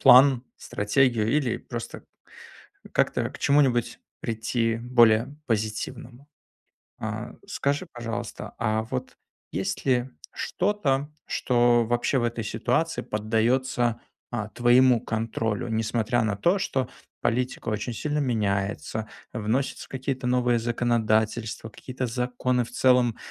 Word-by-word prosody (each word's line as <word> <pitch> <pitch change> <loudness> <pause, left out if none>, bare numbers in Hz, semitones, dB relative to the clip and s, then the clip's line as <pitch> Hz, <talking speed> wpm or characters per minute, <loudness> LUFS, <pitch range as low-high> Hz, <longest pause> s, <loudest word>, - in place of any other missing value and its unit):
план, 130 0 +7
стратегию 110 +1 +1
или 140 -6 +1
просто - - -7 0.9
как-то - - +1
к - - -11
чему-нибудь 135 -4 +2 0.2
прийти 115 0 -1
более 120 +2 +4
позитивному. 120 +4 -3 0.7
А - - -4
скажи, 145 +6 -1
пожалуйста, 115 -2 -5
а 110 -1 +1
вот 130 +2 -5 0.4
есть - - -2
ли 125 -1 +2 0.2
что-то, 150 -8 0 0.2
что 120 -1 +3
вообще 120 +3 +1
в 120 - 0
этой 115 -1 -2
ситуации 125 +9 0
поддается, 115 +2 +1 0.3
а, 110 -4 -3
твоему 120 +1 +5
контролю. 115 +1 -2
Несмотря 115 +2 0
на 105 -2 0
то, 175 - +2
что 135 -9 -1 0.3
политика 125 +1 -1
очень 110 +3 -2
сильно 150 +5 -2
меняется, 110 -3 -1 0.3
вносятся 115 +5 -1
какие-то 130 0 -3
новые 125 -1 +2
законодательства, 115 -1 0
какие-то 130 +3 -5
законы 125 +1 0
в 120 - -12
целом 125 -2 +3
120 Hz, 110 wpm, -26 LUFS, 110-130 Hz, 0.9 s, план